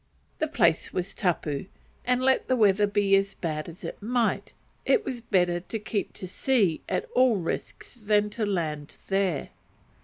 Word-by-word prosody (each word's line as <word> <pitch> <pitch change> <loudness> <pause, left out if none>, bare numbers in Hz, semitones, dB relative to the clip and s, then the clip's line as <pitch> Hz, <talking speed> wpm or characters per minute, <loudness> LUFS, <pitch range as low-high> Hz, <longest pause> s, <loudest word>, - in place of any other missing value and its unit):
The 315 - +1
place 170 - +2
was 180 +1 -3
tapu, 165 -5 -1 0.4
and 250 +1 +2
let 265 0 +3
the 255 - +3
weather 205 -3 +4
be 200 -1 +3
as 195 0 +1
bad 155 -1 -3
as 170 - -12
it - - -6
might, 235 +1 0 0.3
it 440 -3 +2
was 245 -2 -4
better 180 -6 +2
to 185 +5 -5
keep 210 -2 -3
to 185 - -7
sea 195 -5 +1
at - - 0
all 255 -3 +5
risks 175 -4 -4
than 210 -2 +1
to 220 +1 -2
land 160 -7 -2
there. 195 -7 0
200 Hz, 165 wpm, -27 LUFS, 175-230 Hz, 0.4 s, all